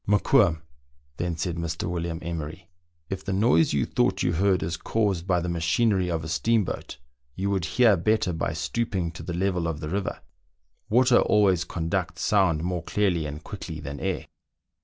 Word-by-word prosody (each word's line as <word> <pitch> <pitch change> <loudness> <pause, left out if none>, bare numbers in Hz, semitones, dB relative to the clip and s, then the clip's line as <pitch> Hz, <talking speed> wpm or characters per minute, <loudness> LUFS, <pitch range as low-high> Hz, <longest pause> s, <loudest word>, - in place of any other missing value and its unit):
" - - -36
Mokoum," 100 -5 +3 0.5
then 85 -1 -2
said 85 -1 -2
Mr. 85 0 -3
William 85 -1 -3
Emery, 85 +1 -6 0.2
" 85 -2 -45
if 95 0 -4
the 100 - -3
noise 95 -5 +3
you 70 -2 +1
thought - - +1
you 85 - +1
heard 95 +1 +2
is 80 +2 -2
caused 95 -1 -1
by 90 -2 +3
the 85 - -3
machinery 90 +3 +1
of 80 -2 -2
a - - -5
steamboat, 100 +6 0 0.4
you 100 +2 -1
would 95 -4 0
hear 110 +5 +4
better 100 +1 +1
by 80 - -1
stooping 95 -7 -2
to 85 - -9
the 85 - -5
level 90 -2 0
of 80 -2 -3
the 75 -1 -5
river; 95 +2 -3 0.7
water 125 +2 +5
always 95 -5 +3
conducts 90 +1 -3
sound 90 -7 +2
more 90 -1 -2
clearly 85 -4 0
and 75 +2 -7
quickly 85 -6 -7
than 70 -1 -6
air." 95 -3 -2
90 Hz, 180 wpm, -26 LUFS, 80-100 Hz, 0.7 s, water